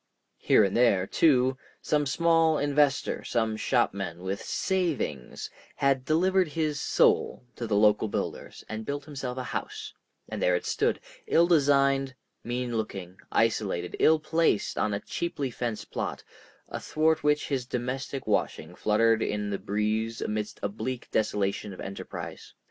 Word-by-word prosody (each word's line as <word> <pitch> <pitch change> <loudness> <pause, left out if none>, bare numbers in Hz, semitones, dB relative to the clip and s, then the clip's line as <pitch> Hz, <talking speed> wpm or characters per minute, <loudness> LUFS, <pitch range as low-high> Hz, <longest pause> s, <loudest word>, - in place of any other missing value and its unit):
Here - - +5
and 100 -1 0
there, 115 -6 +4
too, 130 +1 +3 0.2
some 150 -1 0
small 165 +1 +3
investor, 145 -1 +1
some 110 -2 0
shopman 100 -7 -1
with 95 +1 -3
"savings," 160 - -2 0.2
had 135 -2 +1
delivered 185 +4 +3
his 155 -3 0
soul - - +2
to 120 - -4
the 105 - 0
local 105 +1 +4
builders - - -4
and 110 0 -5
built 145 +3 -4
himself 135 -4 -5
a 130 - -2
house, - - -5 0.3
and - - -5
there 90 - +3
it 90 - -2
stood, - - 0 0.3
ill 170 - +5
designed, 140 -4 +3 0.3
mean 120 -1 -2
looking, 95 -4 -5
isolated, 100 -6 0
ill 160 - +6
placed 160 -7 +1
on 105 -1 0
a - - -2
cheaply 145 0 -3
fenced 115 -2 -4
plot, - - -3 0.4
athwart 160 0 0
which 150 0 +2
his 130 -4 -1
domestic 130 +2 -3
washing 80 +3 -1
fluttered 110 +3 +2
in 105 -1 -1
the 100 - -2
breeze 110 +2 -1
amidst 105 0 -3
a - - +2
bleak 115 +5 -5
desolation 105 -1 0
of - - -12
enterprise. 95 0 -7
125 Hz, 145 wpm, -28 LUFS, 105-145 Hz, 0.4 s, ill